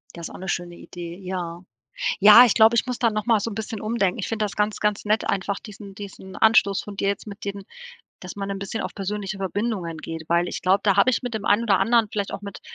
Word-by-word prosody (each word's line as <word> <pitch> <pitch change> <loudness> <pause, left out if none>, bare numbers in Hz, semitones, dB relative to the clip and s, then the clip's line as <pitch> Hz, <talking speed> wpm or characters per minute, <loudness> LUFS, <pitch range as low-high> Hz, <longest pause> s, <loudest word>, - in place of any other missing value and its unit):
Das 170 -1 -7
ist - - -13
auch - - -8
'ne 190 - -8
schöne 175 -1 -3
Idee, 170 -1 -9
ja. 180 -2 -5 0.6
Ja, 210 +4 +10
ich 235 - +3
glaube, 225 +1 +5
ich 235 - +2
muss 250 -2 -3
da 230 -2 +3
noch 210 -1 -3
mal 225 -3 +3
so 230 - -3
'n - - -6
bisschen 220 -1 -5
umdenken. 215 -4 0
Ich - - -4
finde 220 -1 -1
das 205 - -4
ganz, 210 0 0
ganz 210 -1 0
nett 215 +1 0
einfach 200 +1 -1
diesen 200 -2 -11
diesen 195 -2 -9
Anstoß 220 -3 +4
von 205 -1 -9
dir 195 - 0
jetzt 200 +2 -2
mit 205 0 -9
dem, 200 0 -5 0.6
dass 180 - -9
man 200 -1 -5
'n 195 - -3
bisschen 200 +3 -4
auf - - -5
persönlichere 200 0 -4
Verbindungen 190 -4 -3
geht, 160 0 -7
weil 170 +1 +2
ich - - -5
glaube, 190 +2 +3
da 200 -3 +3
habe 255 - +5
ich 245 - -1
mit 245 -1 -4
dem 215 -2 -4
einen 210 +3 +3
oder 205 -5 +3
anderen 230 -2 +3
vielleicht 200 -2 -3
auch - - -6
mit 200 -1 -8
200 Hz, 265 wpm, -23 LUFS, 190-215 Hz, 0.6 s, Ja